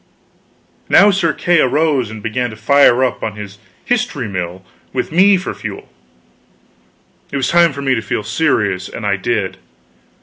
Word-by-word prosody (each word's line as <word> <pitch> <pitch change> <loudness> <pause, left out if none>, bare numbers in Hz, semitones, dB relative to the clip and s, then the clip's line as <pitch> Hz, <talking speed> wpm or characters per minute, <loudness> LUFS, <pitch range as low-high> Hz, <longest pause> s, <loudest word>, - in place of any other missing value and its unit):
Now 205 +1 +6
Sir 175 -4 +1
Kay 175 +2 +1
arose 145 -3 +1
and 110 -1 -9
began 125 +2 -2
to 110 - -9
fire 130 +1 +4
up 130 - -1
on 110 -2 -4
his 105 -1 -9 0.3
history 240 - -1
mill 95 -1 -5 0.3
with - - -2
me 190 +4 +5
for 185 - -5
fuel. - - -8 1.4
It 140 - -2
was 135 - 0
time 170 -1 +4
for 140 +1 -7
me 135 -1 +2
to 115 - -1
feel 105 0 -3
serious, 105 - 0
and 115 - -7
I 100 -1 +1
did. 100 -1 -2
125 Hz, 165 wpm, -16 LUFS, 105-160 Hz, 1.4 s, Now